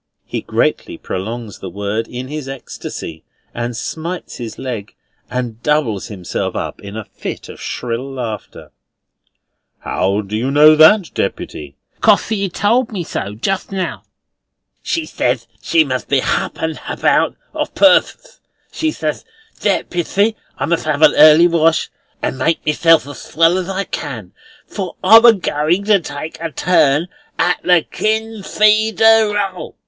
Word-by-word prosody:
He - - -4
greatly - - -1
prolongs 110 +3 -6
the 95 - -7
word 100 +4 -3
in 125 +1 -6
his 150 -1 -6
ecstasy, 85 -10 -8 0.3
and 120 0 -4
smites 170 +7 -5
his 115 -3 -7
leg, 115 -6 -6 0.3
and 120 -2 -4
doubles 145 -10 0
himself 95 -5 -4
up - - -4
in 100 +1 -8
a 110 - -6
fit - - -7
of - - -11
shrill 125 +3 -4
laughter. 115 -5 -6 1.1
"How 100 +2 0
do 105 +1 -6
you 120 +5 -1
know 150 +2 +7
that, 170 +4 +5
Deputy?" 70 -2 -4 0.3
"Cos - - +4
she 200 -3 -1
told 225 +7 +1
me 190 -5 -3
so 105 -9 -5
just 195 - -2
now. 190 -2 -3 0.8
She 330 -3 -2
said 120 - -1 0.2
she 165 -1 +3
must 130 -4 -3
be 140 -2 +2
hup - - -2
and 160 -1 -2
hout - - 0 0.2
o' - - -1
purpose. - - +2 0.3
She 320 - -1
ses, - - -3 0.4
'Deputy, 200 +5 0 0.2
I - - -1
must 165 -2 -1
'ave 155 0 +4
a - - +7
early 155 +2 +7
wash, 165 -1 +2 0.3
and 130 - -2
make 165 +5 0
myself 165 0 +4
as 145 - -9
swell 165 +2 +2
as 185 0 -5
I 195 +1 -2
can, - - -6 0.3
for 190 -4 -6
I'm 225 +5 +8
a 235 - +9
goin' 175 -1 0
to 205 -1 +4
take 155 0 -7
a 165 - -2
turn 150 -2 +2 0.3
at 180 - +1
the 175 -3 +4
KIN 220 0 -1
FREE 215 +2 +3
DER 220 -1 +4
EL! 195 -3 -4
155 Hz, 155 wpm, -17 LUFS, 120-195 Hz, 1.1 s, a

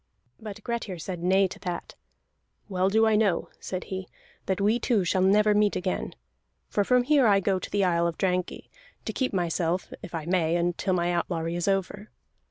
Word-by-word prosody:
But 215 -1 -9
Grettir 230 -6 -3
said 175 +1 -6
nay 190 +2 +3
to - - -10
that. 175 -1 -5 0.7
"Well 190 -1 +1
do 220 +2 +4
I 220 -1 +3
know," 205 -5 +1
said 185 -1 -5
he, 190 -1 -6 0.4
"that 190 0 0
we 210 +4 +2
two 225 -4 +1
shall 185 +2 +1
never 210 +3 +4
meet 210 0 +2
again. 185 0 -3 0.5
For 205 - +1
from 250 +4 +3
here 280 -2 +4
I 200 -2 +5
go 195 -1 0
to - - -7
the 205 -1 +1
island 170 -1 +1
of - - -35
Drangey, 180 -1 -2 0.3
to - - -3
keep 260 - -1
myself 175 -1 -1
if 175 - -8
I 160 -2 -4
may 170 -2 +1
until 175 +2 0
my 175 0 +1
outlawry 170 -1 -2
is 175 +1 -2
over. 195 +2 -1
190 Hz, 190 wpm, -27 LUFS, 175-210 Hz, 0.7 s, I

